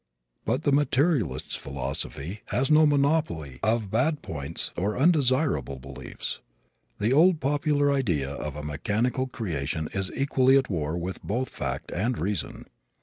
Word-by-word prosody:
But 125 Hz, +7 st, 0 dB
the 145 Hz, -, +2 dB
materialist's 140 Hz, -, +1 dB
philosophy 70 Hz, +6 st, -3 dB
has 135 Hz, +4 st, 0 dB
no 155 Hz, 0 st, +7 dB
monopoly 140 Hz, -, +1 dB
of 110 Hz, -2 st, 0 dB
bad 145 Hz, +7 st, +1 dB
points 70 Hz, -3 st, -4 dB
or 100 Hz, +4 st, -1 dB
undesirable 130 Hz, -, +3 dB
beliefs. 70 Hz, +1 st, -7 dB, 0.6 s
The 110 Hz, +5 st, +1 dB
old 165 Hz, +3 st, +5 dB
popular 145 Hz, 0 st, +2 dB
idea 85 Hz, -, 0 dB
of 75 Hz, 0 st, -5 dB
a 75 Hz, -, -6 dB
mechanical 105 Hz, -, -1 dB
creation 80 Hz, -, -3 dB
is 95 Hz, -1 st, -1 dB
equally 135 Hz, -1 st, +4 dB
at 130 Hz, -5 st, 0 dB
war 80 Hz, -2 st, -1 dB
with 90 Hz, +2 st, -4 dB
both 125 Hz, +5 st, -2 dB
fact -, -, -4 dB
and 115 Hz, +7 st, 0 dB
reason. 100 Hz, -2 st, -3 dB
115 Hz, 140 wpm, -26 LUFS, -, 0.6 s, no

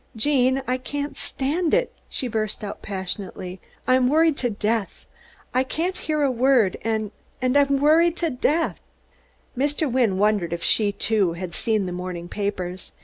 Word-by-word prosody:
"Gene, 260 Hz, +2 st, +2 dB
I 255 Hz, +1 st, 0 dB
can't 285 Hz, +2 st, -4 dB
stand 315 Hz, +7 st, 0 dB
it," -, -, 0 dB, 0.2 s
she 260 Hz, -, -3 dB
burst 215 Hz, -2 st, -2 dB
out 200 Hz, -, -6 dB
passionately. 190 Hz, -1 st, -5 dB, 0.3 s
"I'm 255 Hz, 0 st, +4 dB
worried 315 Hz, +2 st, +4 dB
to 245 Hz, -, 0 dB
death. 215 Hz, -1 st, -2 dB, 0.5 s
I 255 Hz, -, +3 dB
can't 335 Hz, +8 st, -2 dB
hear 305 Hz, -1 st, -1 dB
a 275 Hz, -, +3 dB
word, 250 Hz, -5 st, +3 dB
and 220 Hz, -2 st, -1 dB, 0.3 s
I'm 275 Hz, +2 st, +3 dB
worried 325 Hz, +4 st, +4 dB
to 335 Hz, -2 st, 0 dB
death." 300 Hz, +6 st, 0 dB, 0.8 s
Mr. 290 Hz, +2 st, 0 dB
Wynne 235 Hz, -7 st, +2 dB
wondered 205 Hz, -4 st, +2 dB
if 170 Hz, -, -4 dB
she, 210 Hz, -2 st, +3 dB
too, 200 Hz, -4 st, +1 dB
had 170 Hz, 0 st, -6 dB
seen 215 Hz, 0 st, 0 dB
the 180 Hz, -, -4 dB
morning 180 Hz, -1 st, -5 dB
papers. 185 Hz, -3 st, -4 dB
245 Hz, 155 wpm, -24 LUFS, 200-285 Hz, 0.8 s, I'm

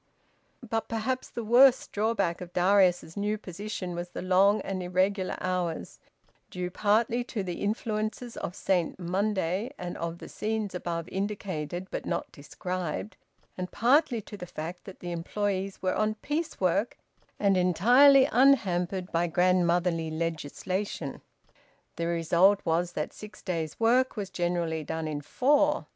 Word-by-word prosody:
But 225 Hz, +1 st, -1 dB
perhaps 230 Hz, +3 st, -2 dB
the 235 Hz, -, -5 dB
worst 250 Hz, +4 st, +5 dB
drawback 205 Hz, -5 st, 0 dB
of 180 Hz, -1 st, -8 dB
Darius's 180 Hz, -3 st, +3 dB
new 210 Hz, +1 st, -1 dB
position 200 Hz, -1 st, -6 dB
was 175 Hz, +1 st, -5 dB
the -, -, -6 dB
long 195 Hz, +3 st, +4 dB
and 190 Hz, -1 st, -4 dB
irregular 185 Hz, +2 st, 0 dB
hours, 180 Hz, -3 st, -3 dB, 0.5 s
due 180 Hz, 0 st, -4 dB
partly 220 Hz, +5 st, +2 dB
to 215 Hz, -5 st, -3 dB
the 180 Hz, -2 st, -5 dB
influences 215 Hz, +2 st, -2 dB
of 180 Hz, -, -5 dB
Saint 180 Hz, -4 st, 0 dB
Monday 190 Hz, +3 st, -1 dB
and 175 Hz, -1 st, -5 dB
of 170 Hz, 0 st, -4 dB
the -, -, -10 dB
scenes 215 Hz, -2 st, -3 dB
above 170 Hz, -2 st, -3 dB
indicated 190 Hz, -4 st, -3 dB
but -, -, -4 dB
not -, -, -2 dB
described, 180 Hz, +6 st, -5 dB, 0.4 s
and 180 Hz, 0 st, -4 dB
partly 245 Hz, +1 st, +3 dB
to 205 Hz, -, -10 dB
the 180 Hz, -3 st, -8 dB
fact 170 Hz, +2 st, -7 dB
that 195 Hz, -, -11 dB
the 175 Hz, -, -5 dB
employes 195 Hz, +3 st, -2 dB
were 185 Hz, -, +1 dB
on 215 Hz, 0 st, 0 dB
piece 300 Hz, +8 st, -3 dB
work 185 Hz, +5 st, +1 dB, 0.4 s
and 200 Hz, -2 st, +3 dB
entirely 245 Hz, -, +6 dB
unhampered 190 Hz, -8 st, +3 dB
by 170 Hz, +1 st, +1 dB
grandmotherly 175 Hz, -1 st, +2 dB
legislation. 165 Hz, +1 st, -3 dB, 0.8 s
The 170 Hz, +1 st, -1 dB
result 170 Hz, +4 st, +4 dB
was 170 Hz, +1 st, 0 dB
that 150 Hz, -, -3 dB
six 210 Hz, 0 st, -11 dB
days' 165 Hz, -4 st, -3 dB
work 245 Hz, +2 st, +3 dB
was 195 Hz, -2 st, -4 dB
generally 175 Hz, -3 st, -1 dB
done 160 Hz, +1 st, -3 dB
in 150 Hz, -1 st, -3 dB
four. 290 Hz, -, +2 dB
185 Hz, 145 wpm, -28 LUFS, 175-215 Hz, 0.8 s, entirely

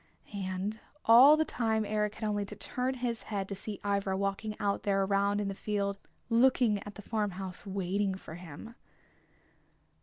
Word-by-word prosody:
And 195 Hz, +2 st, -3 dB, 0.3 s
all 260 Hz, +7 st, +9 dB
the 315 Hz, -, +2 dB
time 220 Hz, -5 st, 0 dB
Eric 210 Hz, 0 st, -1 dB
had 220 Hz, -, -3 dB
only 205 Hz, -1 st, 0 dB
to -, -, -8 dB
turn 255 Hz, +1 st, -2 dB
his 240 Hz, -2 st, -2 dB
head 200 Hz, -3 st, -2 dB
to 200 Hz, -, -4 dB
see 200 Hz, +1 st, -6 dB
Ivra 200 Hz, -1 st, 0 dB
walking 200 Hz, +2 st, -2 dB
out 200 Hz, -1 st, 0 dB
there 195 Hz, -1 st, +1 dB
around 200 Hz, +1 st, +2 dB
in 205 Hz, -, -1 dB
the 195 Hz, -, -2 dB
field, 200 Hz, 0 st, -2 dB, 0.3 s
looking 235 Hz, -3 st, +3 dB
at 205 Hz, -, -9 dB
the 210 Hz, -, -10 dB
farm 215 Hz, -1 st, -1 dB
house, 190 Hz, +1 st, -6 dB
waiting 195 Hz, +1 st, -1 dB
for 185 Hz, -, -10 dB
him. 175 Hz, +6 st, -9 dB
205 Hz, 175 wpm, -31 LUFS, 195-220 Hz, 0.3 s, all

